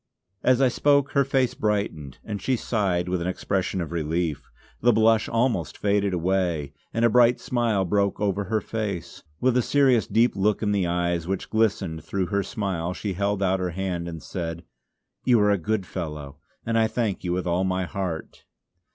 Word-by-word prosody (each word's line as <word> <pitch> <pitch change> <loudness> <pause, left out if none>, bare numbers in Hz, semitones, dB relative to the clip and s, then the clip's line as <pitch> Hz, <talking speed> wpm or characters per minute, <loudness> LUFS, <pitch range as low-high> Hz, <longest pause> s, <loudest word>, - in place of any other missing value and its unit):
As 130 0 +3
I - - +6
spoke 140 +2 +2
her 140 - +3
face 135 -2 +1
brightened 100 -10 -2
and 105 -2 -5
she 130 - +1
sighed 95 -7 0
with 90 -1 -1
an 85 - -2
expression 95 0 -1
of 85 - -5
relief. 80 -2 -2 0.3
The 120 - +5
blush 110 0 +3
almost 115 - 0
faded 100 -1 +1
away, 85 -5 0 0.2
and 115 +1 +1
a - - +5
bright 125 0 +5
smile 115 -6 0
broke 100 +2 +1
over 100 -1 0
her 110 +2 0
face. 100 -7 -4 0.2
With 125 -1 +2
a 125 - +4
serious 130 -4 +3
deep 115 +4 +3
look 105 +2 +1
in 105 - +1
the 100 -3 +1
eyes 85 -1 -1
which 95 0 -3
glistened 100 -8 0
through 95 -2 -1
her 100 - +3
smile 90 -4 -3
she 100 +1 -3
held 100 +1 0
out 95 0 +2
her 90 -1 -1
hand 90 -3 -2
and 80 -4 -7
said: 85 +2 -5 0.6
"You 120 -3 +4
are 105 0 +4
a 100 - +3
good 105 +2 -1
fellow, 75 -5 -6 0.3
and 115 0 +1
I 110 - +4
thank 110 -4 -2
you 90 - -2
with 90 +1 -2
all 90 +1 +1
my 95 0 0
heart." 90 -3 -5
100 Hz, 190 wpm, -25 LUFS, 85-110 Hz, 0.6 s, I